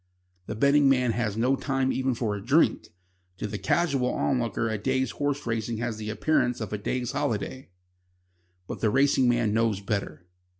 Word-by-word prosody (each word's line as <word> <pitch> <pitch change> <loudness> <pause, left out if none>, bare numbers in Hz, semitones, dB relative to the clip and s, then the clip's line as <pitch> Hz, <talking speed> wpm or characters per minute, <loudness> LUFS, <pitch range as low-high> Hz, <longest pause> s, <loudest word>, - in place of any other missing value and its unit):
The 110 - -4
betting 140 +4 +4
man 125 -3 +3
has 110 -2 -2
no 125 +4 +2
time 135 -1 -1
even 130 -1 0
for 110 -3 -1
a 100 - -7
drink. 140 +8 +2 0.5
To - - -4
the 105 0 -4
casual 140 -7 +1
onlooker 120 -3 0
a 110 -2 -2
day's 130 +2 0
horse 145 -1 -2
racing 115 0 -2
has 115 -1 -3
the 110 0 -5
appearance 125 +1 +1
of 110 -2 -5
a 105 - -2
day's 125 +3 -2
holiday. 130 -3 -3 1.0
But - - -6
the 110 - +2
racing 135 +1 +3
man 120 -3 +1
knows 110 -3 +1
better. 100 -5 -4
120 Hz, 175 wpm, -26 LUFS, 110-135 Hz, 1.0 s, betting